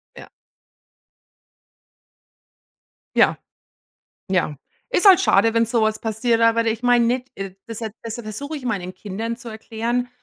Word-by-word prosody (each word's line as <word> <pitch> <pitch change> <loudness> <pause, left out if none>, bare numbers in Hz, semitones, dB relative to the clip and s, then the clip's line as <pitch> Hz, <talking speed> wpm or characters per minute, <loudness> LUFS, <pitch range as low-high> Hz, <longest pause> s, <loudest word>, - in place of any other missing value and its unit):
Ja. - - -11 2.9
Ja. - - +4 0.9
Ja. 175 -5 0 0.3
Ist 425 -5 +2
halt 380 -3 +9
schade, 220 0 +3
wenn 230 0 +4
sowas 220 -1 +1
passiert, 230 +1 0
aber 230 0 +3
ich 225 +1 -1
meine 245 -1 +4
nicht, 250 +2 -1
äh, 195 -1 -6
desha 225 0 -4 0.2
deshalb 230 0 -6
versuche 285 +9 -5
ich 275 - -9
meinen 190 -6 -3
Kindern 220 +4 -5
zu 240 0 -10
erklären 230 +2 -3
230 Hz, 130 wpm, -22 LUFS, 215-245 Hz, 2.9 s, halt